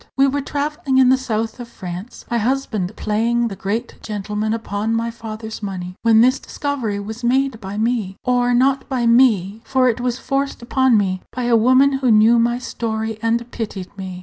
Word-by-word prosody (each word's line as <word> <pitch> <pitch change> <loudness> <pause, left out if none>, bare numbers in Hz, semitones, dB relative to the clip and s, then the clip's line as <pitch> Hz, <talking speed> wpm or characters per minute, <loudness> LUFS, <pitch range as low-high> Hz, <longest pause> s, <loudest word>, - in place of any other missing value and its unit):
We 270 - +5
were 280 +1 0
travelling 285 -1 -2
in 260 -1 +6
the 260 - +6
south 225 -2 -3
of 240 - -7
France, 185 +1 -8
my 235 - +2
husband 220 -6 -1
playing 230 +2 0
the 195 - -6
great 210 +5 -4
gentleman 210 0 -3
upon 220 0 -2
my 230 +1 -1
father's 220 -1 -7
money, 185 -3 -5
when 225 -1 +5
this 255 +3 +4
discovery 255 -8 -3
was 220 +4 -7
made 260 -1 +1
by 195 +1 -6
me 220 -4 -1
or 245 -1 +2
not 270 +3 +2
by 255 -3 0
me; 225 -4 +3
for 260 -1 +2
it 240 +1 -2
was 245 -1 -1
forced 275 -1 -2
upon 260 -1 +3
me 185 -2 0
by 250 - -4
a 240 -1 +3
woman 260 +4 +4
who 260 -2 +1
knew 225 +2 +6
my 240 +1 +2
story 220 -3 -4
and 235 +1 -1
pitied 205 -5 -6
me. 190 -2 -7
230 Hz, 190 wpm, -20 LUFS, 215-255 Hz, -, in